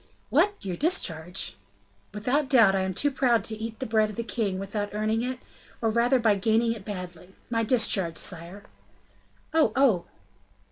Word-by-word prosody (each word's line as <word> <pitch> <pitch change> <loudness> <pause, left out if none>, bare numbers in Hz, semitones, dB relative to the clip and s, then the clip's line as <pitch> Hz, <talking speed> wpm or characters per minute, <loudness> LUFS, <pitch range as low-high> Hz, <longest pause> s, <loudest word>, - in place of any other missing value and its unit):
"What! 410 0 +3
your 185 -2 -3
discharge?" 180 - -1 0.5
"Without 255 +7 0
doubt 230 -8 +6
I 195 - +1
am 190 -1 -2
too 290 +8 +1
proud 245 -5 +2
to 220 0 -2
eat 220 +1 -6
the 260 - -4
bread 220 -2 +2
of 210 - -8
the 235 - -3
king 215 -5 -2
without 205 +2 -3
earning 215 +2 0
it, 255 +1 -3 0.4
or 225 -1 0
rather 240 +4 +3
by 225 -3 +3
gaining 225 +3 +2
it 220 -4 -9
badly. 180 -2 -8 0.2
My 230 -1 +1
discharge, 200 -8 +2
sire!" 180 +3 -4 0.9
"Oh, 320 -9 +4
oh!" 245 -10 +3
220 Hz, 170 wpm, -26 LUFS, 190-240 Hz, 0.9 s, doubt